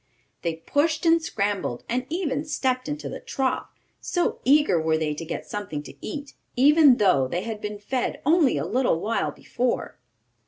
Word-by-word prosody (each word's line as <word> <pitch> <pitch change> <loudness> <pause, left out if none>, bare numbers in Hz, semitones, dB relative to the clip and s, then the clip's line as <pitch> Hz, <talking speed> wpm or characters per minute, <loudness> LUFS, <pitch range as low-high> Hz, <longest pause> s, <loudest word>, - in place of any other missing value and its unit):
They 165 -2 -1
pushed 310 - 0
and 330 0 +5
scrambled, 200 - -2
and 250 +2 -2
even 305 -4 -1
stepped 260 -4 -1
into 295 +1 -4
the - - -6
trough, 275 - -2 0.3
so 350 -1 -1
eager 275 - +4
were 160 0 +2
they 155 -1 -1
to 150 - -6
get 165 - -5
something 190 -8 -5
to - - -11
eat; 280 +4 -6 0.2
even 285 0 +6
though 140 - +3
they 175 +7 -2
had 220 -1 -5
been 210 0 -4
fed 240 +5 -2
only 310 -3 +4
a - - -1
little 245 -8 +1
while 225 +6 -1
before. 245 - -3
250 Hz, 170 wpm, -25 LUFS, 195-295 Hz, 0.3 s, even